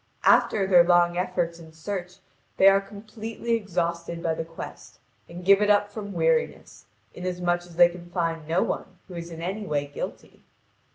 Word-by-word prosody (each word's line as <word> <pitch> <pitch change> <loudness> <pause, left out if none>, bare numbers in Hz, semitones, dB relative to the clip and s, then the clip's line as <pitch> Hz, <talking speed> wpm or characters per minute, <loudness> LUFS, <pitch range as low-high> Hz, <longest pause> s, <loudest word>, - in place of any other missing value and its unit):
After 200 -2 +4
their 180 -2 +6
long 175 0 +4
efforts 170 -1 -2
and 160 -1 -14
search 180 +2 -5 0.4
they 190 - +6
are 195 0 +6
completely 215 +3 -7
exhausted 170 -5 -2
by 165 - +1
the 160 - -3
quest, 165 0 -10 0.3
and 175 +1 -9
give 200 +1 +6
it 210 - +2
up 205 0 +3
from 205 -1 -7
weariness, 485 -1 -1 0.3
inasmuch 180 -1 -1
as 170 - -15
they 175 0 +7
can 175 0 -11
find 165 -3 -2
no 165 +3 +2
one - - -4
who 185 - -11
is 170 0 -7
in 165 0 -8
any 200 +4 -4
way 145 -1 -1
guilty. 145 0 -8
175 Hz, 175 wpm, -25 LUFS, 170-200 Hz, 0.4 s, they